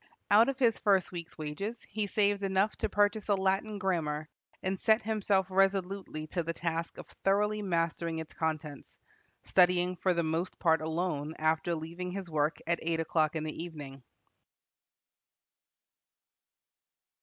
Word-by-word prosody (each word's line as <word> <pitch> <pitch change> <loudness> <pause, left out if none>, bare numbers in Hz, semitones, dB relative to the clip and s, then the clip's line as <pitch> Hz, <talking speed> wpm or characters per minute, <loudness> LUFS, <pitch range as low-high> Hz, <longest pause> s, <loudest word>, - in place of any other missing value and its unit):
Out 220 +5 +7
of 275 - -2
his 235 -4 +3
first 195 -3 +2
week's 170 -2 -7
wages 180 +10 -4
he 210 0 -3
saved 205 0 +2
enough 195 +2 +1
to - - -1
purchase 205 +1 +1
a 205 - +3
Latin 195 +2 0
grammar, 160 -6 -1 0.4
and 190 0 -1
set 220 +1 +3
himself 205 -3 +1
resolutely 195 -4 0
to 175 +3 -2
the 165 0 -3
task 165 0 -3
of - - -8 0.2
thoroughly 210 +2 +2
mastering 170 -3 -1
its 160 -1 -6
contents, 155 -2 -4 0.5
studying 180 0 +3
for 180 0 +1
the 170 - +1
most 165 +3 -2
part 160 -2 +3
alone 160 -2 -2
after 160 +2 +1
leaving 170 +3 -5
his 190 -3 -6
work 150 +1 +1
at 170 0 0
eight 165 0 -1
o'clock 160 -1 +1
in 155 - -1
the 155 +1 -4
evening. 145 -5 -8
175 Hz, 145 wpm, -31 LUFS, 160-195 Hz, 0.5 s, Out